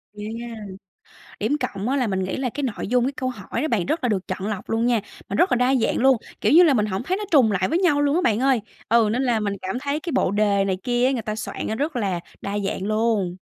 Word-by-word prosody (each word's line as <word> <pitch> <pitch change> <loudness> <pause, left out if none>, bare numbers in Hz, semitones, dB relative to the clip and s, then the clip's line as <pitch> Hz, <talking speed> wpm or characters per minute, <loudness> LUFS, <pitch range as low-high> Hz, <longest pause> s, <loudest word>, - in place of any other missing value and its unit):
Ghê 210 0 -7
nha, 235 0 -6 0.8
điểm 255 +8 0
cộng 225 -5 -3
á 275 - +1
là 250 -4 +1
mình 190 -1 -1
nghĩ 185 - -3
là 260 -2 -1
cái 285 +5 -5
nội 235 -6 -3
dung, 245 +1 +2
cái 270 - 0
câu 260 -2 -3
hỏi 230 0 -5
đó 310 - 0
bạn 205 - 0
rất 320 - -1
là 245 - +2
được 190 -3 -1
chọn 190 +2 -3
lọc 210 -3 -5
luôn 225 +1 +1
nha, 240 -2 +3 0.3
mà 200 - -2
rất 360 - +3
là - - +4
đa 250 +2 +3
dạng 245 - +1
luôn, 265 0 +4 0.2
kiểu - - +2
như 345 +4 +8
là, 310 -5 +5
mình 215 -3 +2
hổng 195 +1 -3
thấy 370 +8 -1
nó 420 - -4
trùng 255 -8 +5
lại 190 -2 +1
với 335 - +1
nhau 310 -6 +3
luôn 290 0 +2
á 355 - +2
bạn 220 -7 +2
ơi. 260 -3 +2 0.3
Ừ, 225 -1 +4
nên 250 +3 0
là 240 -3 +1
mình 205 -2 -1
cảm 190 +6 -3
thấy 285 +2 -2
cái 335 0 -5
bộ 195 - +2
đề 205 -1 +2
này 190 -1 0
kia 245 0 +1
á, 265 - +3
người 245 -4 -1
ta 215 0 -4
soạn - - -5
nó 220 - -2
rất 290 +4 -2
là 195 -7 -1 0.2
đa 200 +1 -3
dạng 195 -1 -3
luôn. 215 -5 0
235 Hz, 295 wpm, -23 LUFS, 205-270 Hz, 0.8 s, như